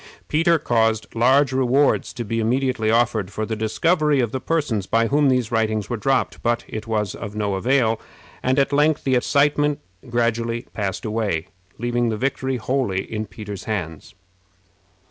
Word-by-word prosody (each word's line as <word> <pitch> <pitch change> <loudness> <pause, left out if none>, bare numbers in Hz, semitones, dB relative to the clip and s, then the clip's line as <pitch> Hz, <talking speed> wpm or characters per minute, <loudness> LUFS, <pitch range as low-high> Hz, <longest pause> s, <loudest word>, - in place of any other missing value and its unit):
Peter 165 +2 +3
caused 110 -5 +1
large 130 +4 +3
rewards 135 +2 +2
to 120 - -5
be 115 +2 -2
immediately 125 -1 0
offered 115 -4 +2
for 110 +1 -3
the 110 - -3
discovery 150 +7 +1
of 120 -4 0
the 130 - -2
persons 125 - -1
by 115 0 +2
whom 145 +3 +3
these 125 -3 +1
writings 110 -1 0
were - - +1
dropped, 130 +4 0
but 120 0 0
it 110 0 -6
was 105 -4 -1
of 105 +1 -7
no 105 -2 -1
avail, 115 +2 +1 0.4
and 130 +1 +1
at 140 0 +2
length 150 +1 +3
the 135 - +1
excitement 145 +3 +2 0.3
gradually 115 0 0
passed 100 -1 -3
away, 105 -7 -1 0.3
leaving 120 0 0
the 110 - -2
victory 130 +1 -1
wholly 120 -6 -1
in 110 0 -3
Peter's 105 -2 -8
hands. 85 -8 -5
115 Hz, 165 wpm, -22 LUFS, 110-135 Hz, 0.4 s, Peter